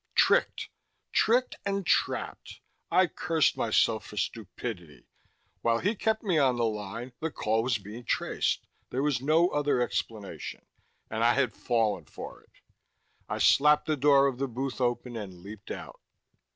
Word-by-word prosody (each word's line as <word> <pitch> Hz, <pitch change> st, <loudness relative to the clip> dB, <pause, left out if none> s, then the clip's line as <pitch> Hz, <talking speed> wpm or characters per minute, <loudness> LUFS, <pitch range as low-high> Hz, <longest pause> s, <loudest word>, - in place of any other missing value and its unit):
Tricked! -, -, +3 dB, 0.4 s
Tricked 245 Hz, +3 st, +2 dB
and 200 Hz, -1 st, -1 dB
trapped! -, -, -1 dB, 0.3 s
I 185 Hz, +2 st, +5 dB
cursed 165 Hz, -1 st, +1 dB
myself 110 Hz, -1 st, +2 dB
for 105 Hz, -, -11 dB
stupidity. 95 Hz, -, -5 dB, 0.6 s
While 115 Hz, 0 st, +2 dB
he 205 Hz, -, 0 dB
kept 220 Hz, +1 st, 0 dB
me 180 Hz, -7 st, +2 dB
on 130 Hz, -3 st, +3 dB
the 120 Hz, -, +2 dB
line, 110 Hz, +3 st, -4 dB
the 160 Hz, -, -2 dB
call 110 Hz, -6 st, 0 dB
was 120 Hz, -1 st, +1 dB
being 105 Hz, +4 st, -10 dB
traced -, -, -1 dB, 0.2 s
there 130 Hz, +2 st, -1 dB
was 145 Hz, -5 st, +1 dB
no 160 Hz, +5 st, +4 dB
other 145 Hz, -4 st, +1 dB
explanation. 110 Hz, -4 st, -4 dB, 0.5 s
And 110 Hz, +1 st, -1 dB
I 120 Hz, +1 st, +4 dB
had 130 Hz, -4 st, +1 dB
fallen 115 Hz, -3 st, 0 dB
for -, -, -9 dB
it! -, -, -28 dB, 0.8 s
I -, -, -2 dB
slapped 150 Hz, +1 st, +5 dB
the 155 Hz, -, +1 dB
door 140 Hz, 0 st, +5 dB
of 130 Hz, -2 st, -1 dB
the 135 Hz, -, 0 dB
booth 130 Hz, +2 st, -4 dB
open 120 Hz, 0 st, -1 dB
and 100 Hz, -5 st, -6 dB
leaped 105 Hz, +1 st, -10 dB
out. -, -, -8 dB
125 Hz, 155 wpm, -28 LUFS, 110-150 Hz, 0.8 s, I